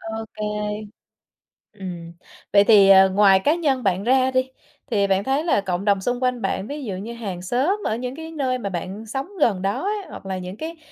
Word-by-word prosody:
ô 220 0 -5
kê. 215 - -7 1.3
Ừm. 180 -5 -8 0.4
Vậy 200 0 +6
thì, 205 -3 +6
ờ, 190 0 +7
ngoài 195 -1 +5
cá 295 +10 +2
nhân 285 -7 0
bạn 195 -2 0
ra 260 +2 +3
đi, 260 0 0 0.4
thì 200 -3 +2
bạn 195 0 +1
thấy 275 +4 0
là 330 -11 +2
cộng 190 0 -3
đồng 200 -2 +2
xung 245 +5 -2
quanh 250 -2 0
bạn 195 0 -2
ví 290 +2 -6
dụ 200 - -4
như 205 +5 -6
hàng 195 -7 -6
xóm 275 - 0
ở 220 - 0
những 250 +2 -5
cái 320 0 -8
nơi 260 -5 -1
mà 200 -5 -4
bạn 190 +5 -5
sống 270 +5 -4
gần 200 -9 +2
đó 195 +1 -1
ấy, 420 +1 0
hoặc - - -10
là 190 -1 -3
những 180 +2 -7
cái 325 +4 -6
215 Hz, 220 wpm, -22 LUFS, 195-260 Hz, 1.3 s, ờ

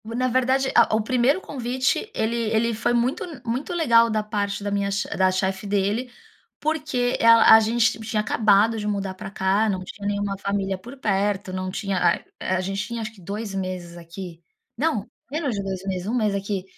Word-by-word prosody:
O 230 +1 -6
na 255 +1 +1
verdade, 260 +2 +1
a - - +5
o 220 - +2
primeiro 255 - +2
convite, 260 - -2
ele 220 +2 0
ele 230 +1 +1
foi 230 +2 0
muito 240 +3 +1 0.2
muito 245 +8 -3
legal 235 -9 +4
da 215 -1 0
parte 205 -1 -2
da 205 - -2
minha 200 0 0 0.3
da 190 0 +3
chefe 190 +1 -2
dele, 205 +5 0 0.5
porque 300 -6 0
ela 230 -1 +7
a - - +8
gente 225 0 +1
tinha 220 0 -2
acabado 215 +1 +3
de 210 - -3
mudar 200 -2 -2
pra 190 +1 -8
cá, 195 +3 +1
não 190 -2 -2
tinha 200 +2 -7
nenhuma 205 -1 -1
família 200 -1 -1
por 240 +8 -11
perto, 200 -4 -1
não 185 0 -3
tinha 195 0 -2
ai 170 - +2
eh, 185 - -1
a 185 - 0
gente 195 +2 -2
tinha 235 -1 -4
acho 215 0 -5
que 200 - -17
2 200 +3 -5
meses 185 -2 -4
aqui, 170 0 -9 0.3
não, 245 -6 0 0.3
menos 295 -4 -1
de 200 - -2
2 190 -1 -4
meses, 185 -1 -3
1 230 - -1
mês 215 -4 +1
aqui, 200 -1 -2
210 Hz, 200 wpm, -24 LUFS, 195-235 Hz, 0.5 s, a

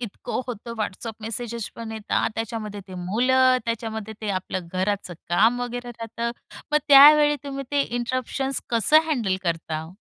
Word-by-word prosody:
इतकं 235 +1 -4
होतं. 235 -1 -6
WhatsApp 215 +2 -4
message 230 0 -4
पण 230 -1 -6
येतात, 220 +1 -1
त्याच्यामध्ये 215 -2 -4
ते 185 - -9
मुलं, 255 +8 +3
त्याच्यामध्ये 220 -2 -4
ते 215 -2 -2
आपलं 185 -1 -5
घराचं 190 -1 -2
काम 225 +8 +3
वगैरे 245 0 -4
राहतं. 230 0 -4 0.4
मग 300 - +5
त्यावेळी 295 +1 +8
तुम्ही 275 -1 -5
ते 285 -1 +2
इंटरप्शन्स 255 +2 -2
कसं 235 +7 +5
हँडल 220 -11 0
करता? 160 -2 -3
230 Hz, 145 wpm, -24 LUFS, 205-255 Hz, 0.4 s, त्यावेळी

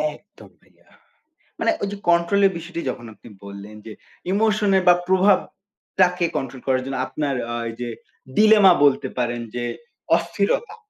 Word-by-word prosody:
একদম 205 - -18
ভাইয়া। - - -30 0.7
মানে - - +2
ওই 200 - -1
যে 205 - -6
কন্ট্রোল 170 +4 +3
এর - - -2
বিষয়টি 170 +1 -6
যখন 120 -1 -6
আপনি 115 - -16 0.2
বললেন 100 +1 -10
যে 110 - -8 0.4
ইমোশন 210 0 +1
এর 190 - +1
বা 175 - +7
প্রভাবটাকে 190 -1 +1
কন্ট্রোল 130 -1 -5
করার 130 -1 +1
জন্য 135 0 -4
আপনার 145 -3 -3 0.2
আ - - -2
এই - - -7
যে 120 - -3 0.5
ডিলেমা 210 -3 +7
বলতে 140 -2 +3
পারেন 120 -1 -1
যে 120 - -3 0.5
অস্থিরতা। 200 - -2
170 Hz, 155 wpm, -22 LUFS, 130-200 Hz, 0.7 s, বা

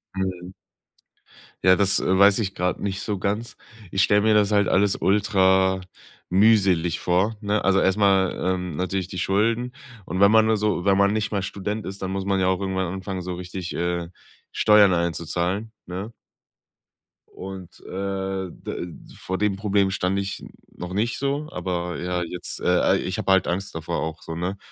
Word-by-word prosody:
Mhm. 95 -1 -3 1.1
Ja, 95 0 +6
das, 100 0 +3
äh, 95 - +1
weiß 100 +1 +6
ich 100 -3 -2
gerade 90 0 -1
nicht 95 -1 -3
so 105 -2 -3
ganz. 105 +4 -2 0.4
Ich 95 - +1
stelle 105 +1 +4
mir 110 +1 +3
das 105 -1 +3
halt 100 -2 +3
alles 100 +1 +3
ultra 95 -2 +3 0.5
mühselig 95 -4 +3
vor, 95 +5 +1
ne? 105 0 0
Also 95 0 +3
erst 95 +1 +2
mal, 95 -2 +3 0.2
ähm, 90 -3 -5
natürlich 95 0 -2
die 90 - -5
Schulden. 115 +7 +1 0.3
Und 90 - -4
wenn 100 +1 +6
man 110 0 +6
nur 110 0 +2
so 105 -4 -1
wenn 100 -1 +4
man 100 0 +4
nicht 110 0 -1
mal 100 -2 -1
Student 105 +2 -4
ist, 100 +1 -7
dann 95 - -3
muss 95 0 -3
man 100 -1 +1
ja 95 - +2
auch 95 -1 +1
irgendwann 95 -2 -2
anfangen, 95 0 -5
so 90 0 -5
richtig, 90 0 -6
äh, 85 0 -2 0.4
Steuern 105 -3 +5
einzuzahlen, 85 +5 -2
ne? 95 +5 -6 1.2
Und, 95 -2 -10
äh, 95 -1 -3
d 85 0 -7 0.2
vor 95 0 -4
dem 105 0 +1
Problem 100 -1 +1
stand 95 0 0
ich 100 0 -4 0.3
noch 90 0 -7
nicht 115 +4 -1
so, 140 +2 -2
aber 90 -2 -3
ja, 90 0 -2
jetzt 90 +1 -6
äh, - - -7
al 90 0 +3
ich - - -3
hab - - -5
halt 95 -1 +4
Angst 95 +3 -2
davor 80 +1 -3
auch 80 0 -4
so, 80 - -7
ne, 90 +4 -3
95 Hz, 180 wpm, -23 LUFS, 90-100 Hz, 1.2 s, Ja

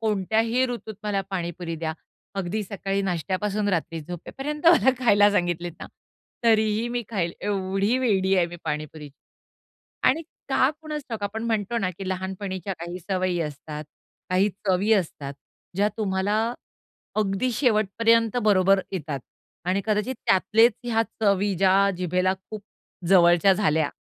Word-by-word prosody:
कोणत्याही 220 +4 +1
ऋतूत 220 -3 -6
मला 205 -2 0
पाणीपुरी 175 -2 -4
द्या. 160 0 -3 0.5
अगदी 195 +3 -2
सकाळी 195 0 -2
नाश्त्यापासून 195 +3 -1
रात्री 165 -3 -1
झोपेपर्यंत 270 - -5
मला 330 -6 +7
खायला 205 -4 +5
सांगितलेत 175 -3 -1
ना, - - -6 0.6
तरीही 220 0 +3
मी 240 0 -2
खाईल, 180 -7 -1
एवढी 195 +3 0
वेडी 195 -6 +2
आहे 175 -2 +3
मी 175 0 -9
पाणीपुरीची. 150 -2 -5 0.9
आणि 320 +5 +2 0.3
का 265 0 +3
कुणास 305 -2 -5
ठाऊक 225 -4 -5
आपण 210 +2 -3
म्हणतो 225 0 0
ना, 185 -4 0
की 195 - -5
लहानपणीच्या 190 +1 -4
काही 175 +2 -6
सवयी 185 -1 -1
असतात, 150 0 -5 0.5
काही 190 +3 +3 0.2
चवी 195 +4 +3
असतात, 150 -8 -1 0.4
ज्या 205 +2 +3
तुम्हाला 210 +3 0 0.6
अगदी 210 +4 +1
शेवटपर्यंत 230 -1 +2
बरोबर 195 -2 +4
येतात 150 -7 -3 0.5
आणि 190 +2 +2
कदाचित 215 +4 0
त्यातलेच 225 +5 +4
ह्या 225 -1 +2 0.2
चवी, 200 -1 +2
ज्या 195 +2 +4
जिभेला 185 +1 +1
खूप 200 +2 -10 0.5
जवळच्या 175 0 +6
झाल्या. 160 -6 +1
195 Hz, 130 wpm, -25 LUFS, 180-220 Hz, 0.9 s, मला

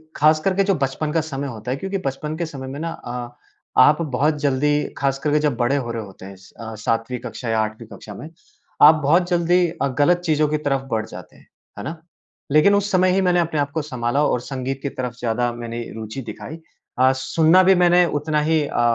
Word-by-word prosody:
ख़ास 155 +1 +4
करके 195 +1 +2
जो 195 -1 +1
बचपन 140 +2 -2
का 165 - +2
समय 140 -2 -5
होता 120 0 -6
है, 135 - -1
क्योंकि 195 +5 -3
बचपन 150 +3 -3
के 170 - -2
समय 135 -4 -8
में 140 +2 -6
ना 165 +1 -3
अ, 120 -5 -6 0.5
आप 150 +5 +5
बहुत 150 +1 0
जल्दी 145 +1 +1 0.2
ख़ास 135 -1 0
करके 150 +1 +1
जब 150 -5 0
बड़े 120 +4 +1
हो 120 -4 -2
रहे 115 -2 -4
होते 95 -1 -12
हैं 95 0 -10 0.2
अ, 115 -1 -7
सातवीं 115 +3 -2
कक्षा 120 - -6
या 110 0 +1
आठवीं 110 +1 -5
कक्षा 105 - -10
में, 150 - -9 0.5
आप 155 +2 +9
बहुत 175 +5 +3
जल्दी 175 0 +3
अ, - - +2
गलत 175 +4 +4
चीज़ों 155 -2 +2
की 155 - 0
तरफ 135 -1 +1
बढ़ 110 -1 0
जाते - - -11
हैं। - - -22 0.3
है - - -6
ना? 160 +3 -5 0.5
लेकिन 155 +7 +5
उस 200 0 0
समय 185 0 +3
ही 190 +1 +2
मैंने 180 -1 +2
अपने 160 -3 -1
आप 145 0 -1
को 160 +1 -2
सँभाला 130 -1 -1
और 125 - +1
संगीत 135 0 -4
की 140 - -2
तरफ 125 -2 -5
ज़्यादा 120 +1 0
मैंने 120 0 -6
रुचि 110 +4 -6
दिखाई 155 +5 -8 0.4
अ, 130 +1 +5
सुनना 160 +7 +3
भी 190 +1 +5
मैंने 175 0 +5
उतना 150 0 0
ही 160 +1 +2
अ, 120 - -1
145 Hz, 220 wpm, -21 LUFS, 125-160 Hz, 0.5 s, आप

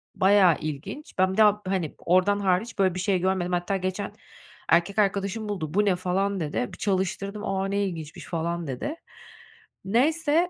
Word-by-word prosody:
Bayağı 190 -3 +5
ilginç. 155 - -6
Ben 185 0 +3
bir - - -6
daha, 210 -1 +5
hani, 185 -5 -2
oradan 185 +3 +3
hariç 200 +3 0
böyle 185 -2 +3
bir - - -3
şey 190 -1 +1
görmedim. 185 -1 0
Hatta 175 +3 0
geçen 185 +2 -3 0.6
erkek 175 +5 +3
arkadaşım 200 +2 0
buldu, 160 -6 -4
"Bu 210 +1 +3
ne?" 190 -3 +3
falan 190 +2 -1
dedi. 150 -6 -2
Bir - - -9
çalıştırdım, 195 +2 -2
"A! 195 0 -1
Ne 200 +1 0
ilginçmiş." 160 -4 -6
falan 170 -1 -3
dedi. 135 - -4 0.9
Neyse 310 - +2
190 Hz, 165 wpm, -26 LUFS, 175-205 Hz, 0.9 s, Bayağı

